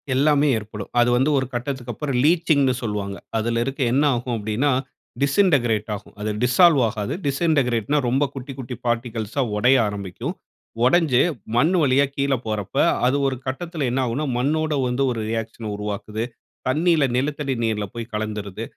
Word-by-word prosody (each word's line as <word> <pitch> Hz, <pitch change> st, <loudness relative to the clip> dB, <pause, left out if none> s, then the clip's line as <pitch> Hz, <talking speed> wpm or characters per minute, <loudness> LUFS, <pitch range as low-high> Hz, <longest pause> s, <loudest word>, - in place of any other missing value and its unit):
எல்லாமே 145 Hz, +1 st, +3 dB
ஏற்படும். 105 Hz, -1 st, -7 dB
அது 120 Hz, 0 st, +4 dB
வந்து 130 Hz, +4 st, +2 dB
ஒரு 130 Hz, -, +1 dB
கட்டத்திற்கப்புறம் 130 Hz, +1 st, -3 dB
லீச்சிங்ன்னு 155 Hz, -4 st, +3 dB
சொல்லுவாங்க. 105 Hz, -3 st, -3 dB, 0.2 s
அதில 115 Hz, +1 st, 0 dB
இருக்க 135 Hz, +1 st, -4 dB
என்ன 140 Hz, +3 st, +3 dB
ஆகும் 120 Hz, 0 st, -2 dB
அப்படினா 110 Hz, +7 st, 0 dB, 0.5 s
டிஸிண்டகிரேட் 140 Hz, -, +2 dB
ஆகும். 105 Hz, -, -12 dB
அது 105 Hz, +1 st, -2 dB
டிசால்வ் 140 Hz, +4 st, +5 dB
ஆகாது. 110 Hz, +3 st, -3 dB
டிஸிண்டகிரேட்னா 140 Hz, -4 st, +1 dB
ரொம்ப 135 Hz, +4 st, +2 dB
குட்டிக் 135 Hz, 0 st, -8 dB
குட்டி 125 Hz, -1 st, -5 dB
பார்ட்டிக்கிள்ஸா 115 Hz, +1 st, -1 dB, 0.2 s
உடைய 125 Hz, +5 st, +5 dB
ஆரம்பிக்கும். 100 Hz, -3 st, -5 dB, 0.5 s
உடைஞ்சு 135 Hz, -3 st, +4 dB, 0.3 s
மண்ணு 160 Hz, +9 st, +3 dB
வழியா 140 Hz, 0 st, +4 dB
கீழ 140 Hz, 0 st, +1 dB
போறப்ப 105 Hz, -3 st, -3 dB, 0.3 s
அது 130 Hz, +3 st, +3 dB
ஒரு 135 Hz, -, -1 dB
கட்டத்தில 155 Hz, +3 st, -3 dB
என்ன 130 Hz, -, 0 dB
ஆகும்னா 125 Hz, +6 st, -2 dB
மண்ணோடு 155 Hz, +4 st, 0 dB
வந்து 125 Hz, +2 st, 0 dB
ஒரு 115 Hz, -2 st, -3 dB
ரியாக்ஷன 115 Hz, 0 st, -4 dB
உருவாக்குது. 105 Hz, +1 st, -4 dB, 0.4 s
தண்ணீல 160 Hz, +3 st, +3 dB
நிலத்தடி 140 Hz, +1 st, -1 dB
நீர்ல 110 Hz, -2 st, 0 dB
போய் 115 Hz, 0 st, -7 dB
கலந்துருது. 105 Hz, -1 st, -4 dB
125 Hz, 145 wpm, -22 LUFS, 110-140 Hz, 0.5 s, டிசால்வ்